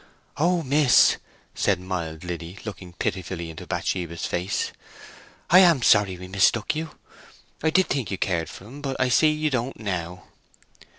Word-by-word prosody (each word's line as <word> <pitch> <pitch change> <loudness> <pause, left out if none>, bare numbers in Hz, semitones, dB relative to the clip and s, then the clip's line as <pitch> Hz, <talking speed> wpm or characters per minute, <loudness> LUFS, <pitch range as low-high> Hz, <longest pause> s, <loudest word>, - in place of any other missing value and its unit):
"Oh 170 +2 +2
miss!" 140 -1 +5 0.4
said 100 -4 +1
mild 85 -4 -5
Liddy, 85 +1 -6
looking 95 -4 -8
pitifully 85 -2 -4
into 80 - -10
Bathsheba's 85 -3 -3
face. 90 +3 -2 0.8
"I 180 - +9
am 170 -9 +5
sorry 100 -5 +4
we 90 +1 -9
mistook 100 +6 +2
you 160 +1 -2
so! - - -21 0.7
I - - +5
did 185 +3 +3
think 135 -7 -2
you 95 - -3
cared 85 -5 -1
for - - -11
him; 135 +7 -11
but 135 -2 -4
I 130 -1 +2
see 155 +5 +5
you 155 0 -1
don't 125 0 -2
now." 90 -4 -4
100 Hz, 165 wpm, -24 LUFS, 90-140 Hz, 0.8 s, I